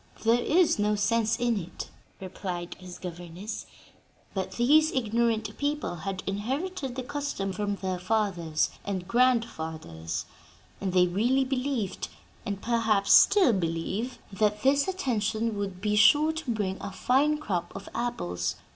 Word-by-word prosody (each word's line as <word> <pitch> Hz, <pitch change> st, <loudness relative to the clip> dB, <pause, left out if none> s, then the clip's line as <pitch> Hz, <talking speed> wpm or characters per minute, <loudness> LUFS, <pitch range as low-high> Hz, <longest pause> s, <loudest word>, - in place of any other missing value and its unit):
"There 230 Hz, +2 st, +4 dB
is 335 Hz, -4 st, +3 dB
no 210 Hz, 0 st, +2 dB
sense 225 Hz, +2 st, +1 dB
in 240 Hz, -3 st, +1 dB
it," 175 Hz, -1 st, -8 dB, 0.3 s
replied 180 Hz, -2 st, -5 dB
his 180 Hz, -1 st, -9 dB
governess, 175 Hz, +3 st, -7 dB, 0.7 s
"but 190 Hz, -2 st, -3 dB
these 305 Hz, +6 st, +4 dB
ignorant 230 Hz, -2 st, 0 dB
people 290 Hz, -10 st, -1 dB
had 190 Hz, +3 st, -4 dB
inherited 265 Hz, -, -3 dB
the 260 Hz, -, -3 dB
custom 280 Hz, -8 st, -3 dB
from 205 Hz, +1 st, -1 dB
their 185 Hz, -2 st, -3 dB
fathers 180 Hz, -6 st, 0 dB
and 185 Hz, -3 st, -3 dB
grandfathers, 160 Hz, -, 0 dB, 0.6 s
and 195 Hz, -2 st, -1 dB
they 180 Hz, 0 st, +5 dB
really 240 Hz, +9 st, +2 dB
believed 260 Hz, -5 st, -2 dB, 0.4 s
and 200 Hz, -1 st, -2 dB
perhaps 220 Hz, -3 st, +2 dB
still 400 Hz, -, +7 dB
believe 190 Hz, +7 st, -2 dB, 0.2 s
that 210 Hz, +1 st, +1 dB
this 280 Hz, +3 st, +4 dB
attention 230 Hz, -, -1 dB
would 195 Hz, -2 st, -4 dB
be 210 Hz, 0 st, +1 dB
sure 295 Hz, +9 st, +6 dB
to 320 Hz, -4 st, -6 dB
bring 205 Hz, -4 st, -1 dB
a 200 Hz, -, -5 dB
fine 275 Hz, +9 st, +2 dB
crop 185 Hz, -, -3 dB
of -, -, -7 dB
apples. 90 Hz, -, -2 dB
210 Hz, 140 wpm, -28 LUFS, 185-255 Hz, 0.7 s, still